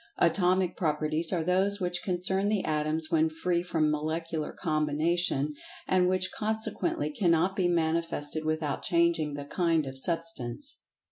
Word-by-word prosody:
Atomic 180 +1 +2
Properties 155 0 0
are 175 -4 0
those 190 +4 +2
which 180 -1 -1
concern 190 +2 0
the 205 -2 0
Atoms 155 +1 0
when 160 0 +3
free 170 +2 -1
from 160 -3 0
Molecular 155 +1 -3
combination, 155 -1 0 0.3
and 180 -1 +3
which 185 0 0
consequently 220 +11 -2
cannot 185 - +1
be 185 -2 +1
manifested 160 -2 0
without 155 -2 -2
changing 170 -3 +1
the 145 0 -6
"kind" 165 0 +1
of 135 0 -7
Substance. 165 - -1
170 Hz, 135 wpm, -28 LUFS, 155-185 Hz, 0.3 s, when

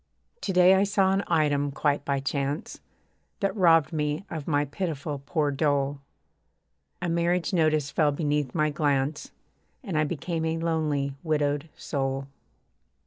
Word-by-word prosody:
To - - -2
day 180 0 +6
I 190 +1 +4
saw 200 -2 +2
an 195 +1 +1
item, 145 -3 +2
quite 145 0 0
by 140 -1 0
chance, 140 +2 -3 0.6
That 195 0 0
robbed 165 -6 +4
me 150 +3 -1
of 155 -3 -5
my 145 -2 +2
pitiful 145 -2 -4
poor 150 -4 +1
dole: 140 -1 0 1.0
A - - 0
marriage 170 +1 0
notice 155 -4 +2
fell 150 -2 +2
beneath 145 -3 -1
my 155 -2 +2
glance, 145 0 0 0.5
And 185 - -4
I 155 - +3
became 165 +2 -3
a 160 0 0
lonely 155 -4 -1
widowed 150 -1 0
soul. 135 -1 -2
150 Hz, 140 wpm, -27 LUFS, 145-170 Hz, 1.0 s, day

